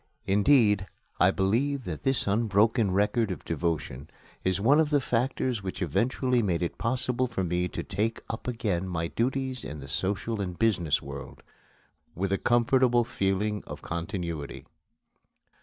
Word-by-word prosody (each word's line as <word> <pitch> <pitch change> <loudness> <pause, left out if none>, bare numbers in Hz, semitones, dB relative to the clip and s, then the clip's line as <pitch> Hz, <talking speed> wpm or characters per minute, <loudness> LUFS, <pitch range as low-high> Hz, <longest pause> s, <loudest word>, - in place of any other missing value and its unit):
Indeed, 105 -1 +4 0.3
I 90 - +6
believe 120 +9 +1
that 80 -7 -5
this 135 -1 0
unbroken 110 +1 +2
record 105 +4 +1
of 90 - -5
devotion 75 -4 -2 0.3
is 95 0 +1
one 135 +9 +5
of 155 -2 +3
the 145 -1 +3
factors 125 -2 -1
which 95 -1 -5
eventually 125 0 +1
made 90 -5 0
it 85 - -4
possible 125 +1 0
for 115 -5 -2
me 90 0 0
to - - -5
take 105 +4 -2
up 115 - -6
again 100 -7 -1
my 85 -1 -2
duties 130 0 -1
in 75 +1 -6
the 70 - -9
social 100 +7 -1
and 90 -3 -4
business 95 -9 +2
world, - - -9 0.7
with 95 +2 -1
a 100 - +1
comfortable 120 0 +3
feeling 105 -1 -1
of - - -8
continuity. 85 -3 -4
105 Hz, 150 wpm, -28 LUFS, 90-120 Hz, 0.7 s, I